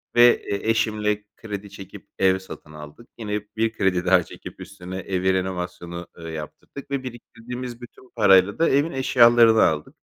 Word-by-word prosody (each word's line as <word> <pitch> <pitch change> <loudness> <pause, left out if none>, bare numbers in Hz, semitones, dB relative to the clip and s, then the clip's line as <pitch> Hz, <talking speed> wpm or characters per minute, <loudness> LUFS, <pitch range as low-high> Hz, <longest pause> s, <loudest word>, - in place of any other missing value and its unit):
ve 120 0 +8
e 105 -3 0
eşimle 105 -2 0
kredi 105 -2 -7
çekip 100 -1 -12
ev 95 0 +3
satın 85 -4 -12
aldık. 75 +10 -12
Yine 105 -2 -3 0.2
bir 115 0 +1
kredi 95 -4 0
daha 90 -1 +4
çekip - - -12
üstüne 95 -1 -9
evi 95 0 -1
renovasyonu, 90 -2 -4
ııı, 80 -1 -8
yaptırdık 80 - -9
ve 140 -1 -2
biriktirdiğimiz 125 0 -8
bütün 125 +1 -14
parayla 95 -3 +4
da 165 - +3
evin 145 +4 +2
eşyalarını 120 -3 +5
aldık. 75 -1 -1
105 Hz, 155 wpm, -23 LUFS, 95-120 Hz, 0.2 s, ve